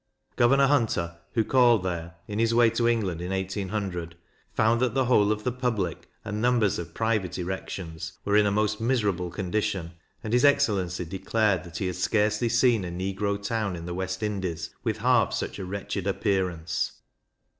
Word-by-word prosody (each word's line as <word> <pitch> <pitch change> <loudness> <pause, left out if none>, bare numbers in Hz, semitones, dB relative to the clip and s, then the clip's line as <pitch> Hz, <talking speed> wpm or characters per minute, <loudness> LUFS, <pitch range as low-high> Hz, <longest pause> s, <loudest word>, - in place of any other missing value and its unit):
Governor 135 +3 +5
Hunter, 105 -12 +1
who 115 - +2
called 120 -4 +4
there 85 -2 -4
in 105 0 -3
his 115 0 +2
way 120 -1 +5
to 115 +1 +1
England 100 -8 0
in 90 - -4
1800, 95 -2 -3 0.4
found 115 +2 +2
that 125 0 +1
the 135 -1 +2
whole 105 -4 +4
of 105 0 -2
the 125 - 0
public, 115 -9 -2 0.2
and 105 +1 -3
numbers 120 -5 +2
of 85 -1 -7
private 110 -6 0
erections, 85 -2 -5
were 100 - +2
in 105 -1 +5
a - - +1
most 105 +1 0
miserable 105 -8 0
condition; 95 -1 -2 0.3
and 110 -1 -3
his 125 - +4
excellency 95 -11 +2
declared 95 +2 0
that 85 -1 -8
he 95 - -2
had 90 -1 -2
scarcely 105 +4 +1
seen 120 -3 +3
a 90 - -4
negro 95 +3 -2
town 105 -2 -2
in 85 -1 -7
the 90 - -4
West 95 +3 -3
Indies 90 -5 -3
with 110 -3 -1
half 120 +1 +3
such - - -3
a 95 - -4
wretched 100 0 -4
appearance. 90 -5 -1
100 Hz, 175 wpm, -26 LUFS, 90-115 Hz, 0.4 s, Governor